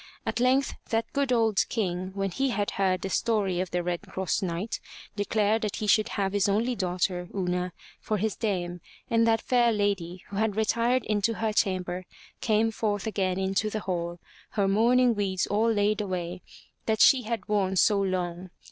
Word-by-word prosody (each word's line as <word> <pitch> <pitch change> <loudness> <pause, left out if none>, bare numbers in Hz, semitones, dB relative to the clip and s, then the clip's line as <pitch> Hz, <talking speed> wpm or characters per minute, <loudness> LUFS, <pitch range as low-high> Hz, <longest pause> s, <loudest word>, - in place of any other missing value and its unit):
At - - -1
length 260 +3 +3 0.2
that 225 0 -1
good 280 -2 0
old 225 -4 +3
King, 185 -5 -2
when 195 -1 -1
he 270 +8 0
had 205 -4 -1
heard 185 -2 0
the 195 - -2
story 200 -6 +1
of 185 0 -2
the 180 0 -1
Red 175 -1 -2
Cross 190 -2 -2
Knight, 185 +3 -3 0.4
declared 210 +1 +1
that 210 -3 -2
he 215 - -3
should 215 +2 +3
have 195 -1 0
his 205 -1 +2
only 225 +5 +1
daughter, 180 -2 -1
Una, 180 -1 -1 0.3
for 215 - -2
his 215 +1 -1
dame, 180 -5 -2 0.3
and 230 0 +4
that 225 0 +3
fair 240 -2 +3
lady 195 -4 -1
who 200 - -6
had 215 -1 +1
retired 230 +3 +1
into 215 +2 +1
her 220 0 -1
chamber 185 -3 -1 0.3
came 220 0 +2
forth 205 -2 -2
again 190 -4 -1
into 195 +2 0
the 215 0 -3
hall, 175 -2 -3 0.4
her 200 -2 +1
mourning 240 +5 +4
weeds 195 -3 0
all 220 +3 +2
laid 210 0 +1
away, 180 -2 -4 0.5
that 220 -1 +1
she 265 - +7
had 225 -3 -4
worn 195 -2 +1
so 200 +2 +4
long. 185 -1 -2
205 Hz, 185 wpm, -27 LUFS, 185-220 Hz, 0.5 s, she